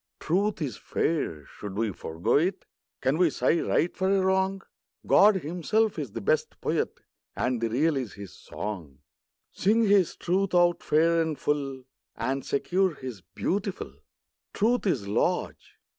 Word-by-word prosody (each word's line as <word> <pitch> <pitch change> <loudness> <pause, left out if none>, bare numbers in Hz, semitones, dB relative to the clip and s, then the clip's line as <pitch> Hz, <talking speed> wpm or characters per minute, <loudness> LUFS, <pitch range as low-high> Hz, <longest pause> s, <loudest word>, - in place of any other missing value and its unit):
Truth 190 +1 0
is 135 - -4
fair; 80 - -2
should 100 +5 -8
we 110 -1 0
forego 85 +3 -2
it? 185 +5 0 0.4
Can 135 +5 +1
we 180 -2 +5
sigh 145 +4 +1
right 170 - +1
for 190 0 0
a 195 0 +3
wrong? 190 +1 +1 0.4
God 210 0 +6
Himself 180 +5 0
is 135 -9 -5
the - - -4
best - - 0
Poet, - - -1 0.4
And 125 -2 -1
the 115 - 0
Real 150 +7 +2
is 125 -6 -4
His 100 -2 -10
song. 85 -11 -7 0.5
Sing 220 +5 +2
His 200 -4 +3
Truth 185 +1 0
out 175 0 +4
fair 165 +2 +3
and 160 -2 -2
full, 135 -3 -2 0.3
And 135 +3 -2
secure 180 +4 0
His 125 -8 -7
beautiful. 185 - -3 0.6
Truth 230 +1 +2
is 125 - 0
large. 100 - -1
160 Hz, 150 wpm, -27 LUFS, 125-190 Hz, 0.6 s, God